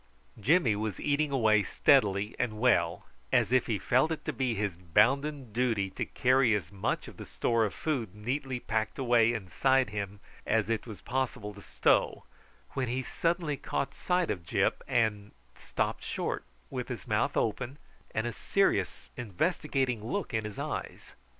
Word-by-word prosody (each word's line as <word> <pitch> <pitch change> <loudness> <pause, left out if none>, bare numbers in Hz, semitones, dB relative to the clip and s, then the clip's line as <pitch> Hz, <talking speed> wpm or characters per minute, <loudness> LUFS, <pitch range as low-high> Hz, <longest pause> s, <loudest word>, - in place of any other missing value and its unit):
Jimmy 130 - +3
was 105 -1 -3
eating 150 +1 +1
away 110 -6 +4
steadily 100 +2 +3
and 110 -3 -1
well, 90 -8 +2 0.3
as - - +3
if 130 -2 +3
he 110 - 0
felt 130 +9 +2
it 160 - -4
to 155 - -2
be 125 -1 0
his 100 -3 -1
bounden 130 - +1
duty 115 -5 +1
to - - -3
carry 130 -3 +3
as 90 -4 -4
much 100 -1 -2
of - - -11
the - - -8
store 115 -1 +1
of 105 - -3
food 125 - -2
neatly 130 +4 -3
packed 110 -2 -2
away 120 -3 +4
inside 120 +4 +1
him 100 -1 -4 0.2
as 110 0 +1
it 115 +1 -1
was 110 -3 -8
possible 125 -5 -2
to 100 - -12
stow, - - +1 0.5
when 130 -2 -2
he 130 +3 -1
suddenly 165 +1 -1
caught 135 0 -2
sight 180 -1 0
of 90 - -4
Gyp, 80 - +1
and 105 -3 0 0.2
stopped - - -2
short - - -3 0.3
with - - -3
his - - -6
mouth - - +1
open 125 +5 -1 0.3
and 110 - -2
a 120 - -1
serious - - 0
investigating 125 - -1
look 180 - -3
in 110 -1 0
his 105 -1 -6
eyes. - - -5
115 Hz, 165 wpm, -30 LUFS, 105-130 Hz, 0.5 s, away